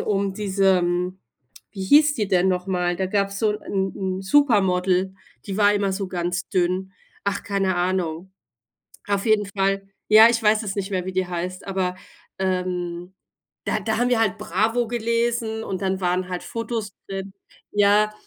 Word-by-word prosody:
um 200 Hz, -2 st, -1 dB
diese 195 Hz, -2 st, +2 dB
hm, 180 Hz, +1 st, -1 dB, 0.5 s
wie 195 Hz, -2 st, -6 dB
hieß 295 Hz, +7 st, +5 dB
die 210 Hz, -3 st, -2 dB
denn 185 Hz, -1 st, +3 dB
noch 180 Hz, 0 st, -1 dB
mal? 180 Hz, -2 st, 0 dB
Da 190 Hz, -, -1 dB
gab's 200 Hz, 0 st, -1 dB
so 220 Hz, -2 st, +2 dB
'n 210 Hz, 0 st, -4 dB, 0.3 s
'n 190 Hz, -1 st, -3 dB
'n 190 Hz, -, -7 dB
Supermodel, 190 Hz, -7 st, +2 dB, 0.3 s
die 195 Hz, -1 st, -4 dB
war 205 Hz, -1 st, +5 dB
immer 200 Hz, -1 st, 0 dB
so 190 Hz, -1 st, -3 dB
ganz 180 Hz, +1 st, -3 dB
dünn. 185 Hz, 0 st, 0 dB, 0.3 s
Ach, 200 Hz, -, -1 dB
keine 195 Hz, -2 st, 0 dB
Ahnung. 180 Hz, 0 st, -2 dB, 0.8 s
Auf 200 Hz, +1 st, 0 dB
jeden 215 Hz, -2 st, +3 dB
Fall 195 Hz, 0 st, -1 dB, 0.3 s
ja, 220 Hz, +2 st, +10 dB
ich 235 Hz, -1 st, 0 dB
weiß 215 Hz, +1 st, +3 dB
es 195 Hz, -2 st, -3 dB
nicht 200 Hz, 0 st, -3 dB
mehr, 185 Hz, -2 st, -1 dB
wie 190 Hz, -, -3 dB
die 185 Hz, -1 st, -1 dB
heißt, 180 Hz, +1 st, -4 dB
aber, 185 Hz, -2 st, -1 dB, 0.5 s
ähm, 180 Hz, -1 st, -2 dB, 0.5 s
da -, -, 0 dB
da 220 Hz, +2 st, -1 dB
haben 245 Hz, +1 st, +2 dB
wir 245 Hz, -, +2 dB
halt 210 Hz, -5 st, +1 dB
Bravo 225 Hz, +6 st, 0 dB
gelesen 230 Hz, -1 st, -1 dB
und 195 Hz, -2 st, -4 dB
dann 190 Hz, 0 st, -1 dB
waren 180 Hz, 0 st, 0 dB
halt 180 Hz, -1 st, -4 dB
Fotos 230 Hz, -2 st, -4 dB, 0.2 s
drin 195 Hz, 0 st, -5 dB, 0.4 s
ja. 210 Hz, +1 st, +4 dB
195 Hz, 175 wpm, -23 LUFS, 185-210 Hz, 0.8 s, ja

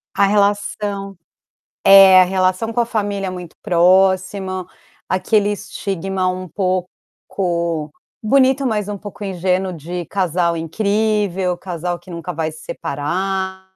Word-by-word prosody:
A 200 Hz, -, +4 dB
relação 200 Hz, -1 st, 0 dB, 0.7 s
é, 195 Hz, -1 st, +9 dB
a -, -, +5 dB
relação 185 Hz, +4 st, 0 dB
com 240 Hz, -, 0 dB
a 235 Hz, -, +1 dB
família 205 Hz, -4 st, -2 dB
é -, -, -2 dB
muito 180 Hz, -2 st, -8 dB
próxima, 185 Hz, +1 st, +2 dB, 0.4 s
aquele 205 Hz, +2 st, +1 dB
estigma 195 Hz, -2 st, -3 dB
um 185 Hz, 0 st, -4 dB
pouco 175 Hz, -3 st, -3 dB, 0.3 s
bonito, 265 Hz, +4 st, +3 dB
mas 210 Hz, -4 st, -1 dB
um 205 Hz, -, -3 dB
pouco 205 Hz, +1 st, -10 dB
ingênuo 185 Hz, 0 st, -1 dB
de 175 Hz, +1 st, -6 dB
casal 175 Hz, -3 st, 0 dB
incrível, 200 Hz, +1 st, 0 dB
casal 175 Hz, -1 st, -4 dB
que 175 Hz, +2 st, -16 dB
nunca 170 Hz, -2 st, -5 dB
vai 160 Hz, 0 st, -3 dB
se 155 Hz, -, -12 dB
separar 190 Hz, +6 st, -3 dB
190 Hz, 125 wpm, -19 LUFS, 180-200 Hz, 0.7 s, é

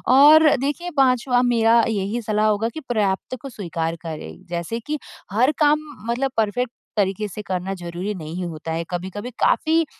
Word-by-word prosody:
और 305 Hz, +2 st, +8 dB
देखिए 290 Hz, +7 st, -2 dB
पाँचवा 255 Hz, -1 st, +3 dB
मेरा 230 Hz, -1 st, +4 dB
यही 215 Hz, +2 st, -1 dB
सलाह 215 Hz, 0 st, +1 dB
होगा, 215 Hz, +2 st, +1 dB
कि 315 Hz, -, -7 dB
पर्याप्त 210 Hz, +1 st, 0 dB
को 275 Hz, -, -7 dB
स्वीकार 165 Hz, -6 st, -3 dB
करें। 160 Hz, +3 st, -7 dB
जैसे 175 Hz, +7 st, -3 dB
की 295 Hz, +5 st, -4 dB, 0.3 s
हर 250 Hz, +6 st, +4 dB
काम 300 Hz, 0 st, +4 dB, 0.3 s
मतलब 265 Hz, +2 st, 0 dB
परफ़ेक्ट 230 Hz, +3 st, 0 dB, 0.3 s
तरीक़े 200 Hz, +1 st, +1 dB
से 210 Hz, -, -6 dB
करना 185 Hz, 0 st, -3 dB
ज़रूरी 175 Hz, +3 st, -4 dB
नहीं 170 Hz, +1 st, -5 dB
होता 160 Hz, 0 st, -6 dB
है। 165 Hz, +1 st, -1 dB
कभी-कभी 190 Hz, +6 st, -4 dB
काफ़ी, 325 Hz, +1 st, +3 dB
215 Hz, 160 wpm, -22 LUFS, 185-255 Hz, 0.3 s, और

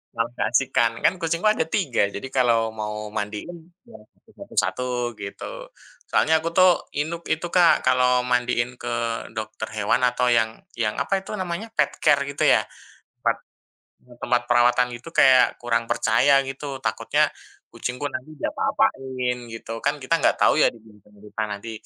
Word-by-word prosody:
malah 115 Hz, 0 st, -1 dB
keasikkan. 120 Hz, -1 st, +2 dB
Kan -, -, +5 dB
kucingku 165 Hz, +4 st, -1 dB
ada 215 Hz, -, +1 dB
3, 135 Hz, -, +1 dB
jadi 100 Hz, -, -7 dB
kalau 115 Hz, -3 st, +2 dB
mau 105 Hz, -1 st, -5 dB
mandiin, 160 Hz, +12 st, -6 dB, 0.2 s
ya -, -, -14 dB
satu -, -, -32 dB
satu -, -, -12 dB
satu 125 Hz, 0 st, -2 dB, 0.3 s
gitu, 100 Hz, 0 st, -7 dB, 0.6 s
soalnya 160 Hz, 0 st, +3 dB
aku 165 Hz, -, -2 dB
tuh 185 Hz, -1 st, +4 dB
inuk 165 Hz, +3 st, -3 dB
itu 165 Hz, +2 st, -1 dB
Kak, 175 Hz, -2 st, +4 dB
kalau 125 Hz, 0 st, +3 dB
mandiin 125 Hz, 0 st, 0 dB
ke 120 Hz, 0 st, -3 dB, 0.4 s
dokter 110 Hz, 0 st, -5 dB
hewan 105 Hz, +4 st, +1 dB
atau 125 Hz, 0 st, +2 dB
yang 115 Hz, -1 st, +1 dB, 0.2 s
yang 110 Hz, -3 st, -1 dB
apa 195 Hz, -1 st, 0 dB
itu 200 Hz, +2 st, -6 dB
namanya, 185 Hz, +4 st, -4 dB
pet -, -, +3 dB
care 140 Hz, -1 st, +4 dB
gitu 140 Hz, 0 st, +1 dB
ya? -, -, +4 dB, 0.6 s
Tempat -, -, +2 dB, 0.7 s
mmm, 125 Hz, -1 st, -17 dB
tempat 120 Hz, 0 st, +1 dB
perawatan 120 Hz, +1 st, +4 dB
gitu 125 Hz, +8 st, -10 dB
kayak 130 Hz, -1 st, +5 dB
kurang 120 Hz, -1 st, 0 dB
percaya 135 Hz, +6 st, +3 dB
gitu, 135 Hz, 0 st, -6 dB
takutnya -, -, +1 dB, 0.4 s
kucingku 125 Hz, +2 st, -5 dB
nanti 150 Hz, +5 st, -7 dB
diapa-apain 130 Hz, -2 st, -1 dB
gitu. 115 Hz, 0 st, -7 dB
Kan 145 Hz, +1 st, +1 dB
kita 165 Hz, +6 st, +2 dB
nggak -, -, +2 dB
tahu -, -, +4 dB
ya -, -, +6 dB
di 115 Hz, -, -16 dB
belakang 105 Hz, -1 st, -21 dB
kita 105 Hz, +1 st, -6 dB
nanti 105 Hz, +2 st, -6 dB
125 Hz, 160 wpm, -23 LUFS, 115-145 Hz, 0.7 s, ya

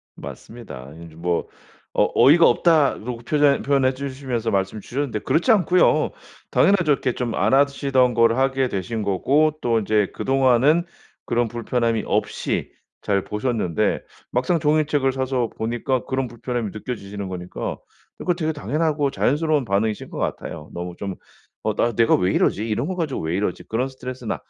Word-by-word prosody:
맞습니다. 70 Hz, -, -10 dB
이제 80 Hz, -1 st, -14 dB
뭐 85 Hz, +1 st, -1 dB, 0.5 s
어 -, -, +4 dB
어이가 165 Hz, +5 st, +7 dB
없다라고 140 Hz, -8 st, +2 dB
표현 145 Hz, +3 st, +2 dB
표현해주시면서 130 Hz, -3 st, -1 dB
말씀 100 Hz, +1 st, -1 dB
주셨는데 130 Hz, -3 st, -3 dB
그렇지 175 Hz, -, +2 dB
않고요. 185 Hz, -3 st, +4 dB, 0.4 s
당연하죠. 180 Hz, -6 st, +3 dB
이렇게 130 Hz, -2 st, -1 dB
좀 120 Hz, -3 st, -3 dB
안 -, -, +1 dB
하시던 135 Hz, -3 st, +3 dB
걸 115 Hz, 0 st, +4 dB
하게 135 Hz, 0 st, +1 dB
되신 105 Hz, +2 st, -3 dB
거고 140 Hz, -, +2 dB
또 115 Hz, -2 st, +2 dB
이제 105 Hz, -1 st, +1 dB
그동안은 135 Hz, +5 st, +3 dB, 0.4 s
그런 120 Hz, 0 st, +1 dB
불편함이 115 Hz, -1 st, -1 dB
없이 -, -, -1 dB, 0.3 s
잘 100 Hz, -2 st, +1 dB
보셨는데 105 Hz, -6 st, -1 dB, 0.3 s
막상 130 Hz, +8 st, +1 dB
종이책을 150 Hz, -3 st, +2 dB
사서 130 Hz, -3 st, -1 dB
보니까 120 Hz, +2 st, -1 dB
그런 130 Hz, 0 st, -1 dB
불편함이 120 Hz, -2 st, -4 dB
느껴지시는 100 Hz, -3 st, -6 dB
거니까 90 Hz, -1 st, -5 dB, 0.4 s
그거 180 Hz, -, 0 dB
되게 160 Hz, -2 st, -2 dB
당연하고 150 Hz, -1 st, 0 dB
자연스러운 150 Hz, +1 st, +1 dB
반응이신 105 Hz, +1 st, -1 dB
것 -, -, -8 dB
같아요. 75 Hz, -, -4 dB
너무 90 Hz, 0 st, -5 dB
좀 100 Hz, -2 st, -4 dB, 0.5 s
'어 -, -, -1 dB
나 120 Hz, -, +2 dB
내가 115 Hz, +2 st, +4 dB
왜 90 Hz, +1 st, +1 dB
이러지? 110 Hz, +3 st, +1 dB
이런 115 Hz, +7 st, -1 dB
거 185 Hz, -, -3 dB
가지고 160 Hz, -6 st, -2 dB
왜 80 Hz, +2 st, -2 dB
이러지?' 100 Hz, -, -2 dB
그런 125 Hz, +4 st, -1 dB
스트레스는 130 Hz, -3 st, -5 dB
125 Hz, 365 characters per minute, -22 LUFS, 110-140 Hz, 0.5 s, 어이가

